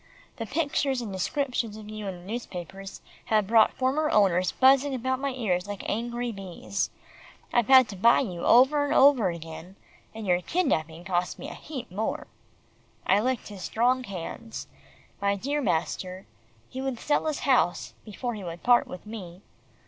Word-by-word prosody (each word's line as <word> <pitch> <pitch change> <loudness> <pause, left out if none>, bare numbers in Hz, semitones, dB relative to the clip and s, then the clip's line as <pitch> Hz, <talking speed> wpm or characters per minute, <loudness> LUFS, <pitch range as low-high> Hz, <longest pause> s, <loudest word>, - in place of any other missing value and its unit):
The 225 -3 -5
pictures 285 -2 0
and 220 -5 -5
descriptions 230 +2 -2
of 215 -1 -10
you 215 -1 -6
in 190 - -4
the 175 - -14
newspapers 195 -3 -7 0.2
have 215 -2 +2
brought 220 +2 +4
former 280 +4 +1
owners 185 -3 +3
buzzing 270 +1 +4
about 260 +1 -1
my 280 0 -1
ears 205 -8 -1
like 205 -1 -6
angry 240 +2 -2
bees. 195 -1 -4 0.6
I've 240 -3 +3
had 260 -2 +8
to 200 - -6
buy 230 +5 +5
you 180 -9 -4
over 265 +5 +5
and 290 +1 0
over 265 -8 +6
again, 170 +2 -8 0.4
and 220 -1 -6
your 180 -1 +2
kidnapping 165 - -1
cost 180 -1 -1
me 280 - -7
a - - -7
heap 265 -6 -8
more." 215 +4 -3 0.8
I 195 +2 +4
licked 250 +1 -1
his 200 -3 -9
strong 250 +6 +1
hands. 200 +3 -7 0.6
My 200 0 +2
dear 280 +9 -2
master 185 - -2 0.4
he 260 - -6
would 265 -3 -3
sell 300 +1 0
his 310 - -2
house, 245 -10 +2
before 240 +3 -4
he 210 -3 -7
would 170 -1 -7
part 245 0 +5
with 180 - -9
me. 190 -4 -9
220 Hz, 170 wpm, -27 LUFS, 185-260 Hz, 0.8 s, had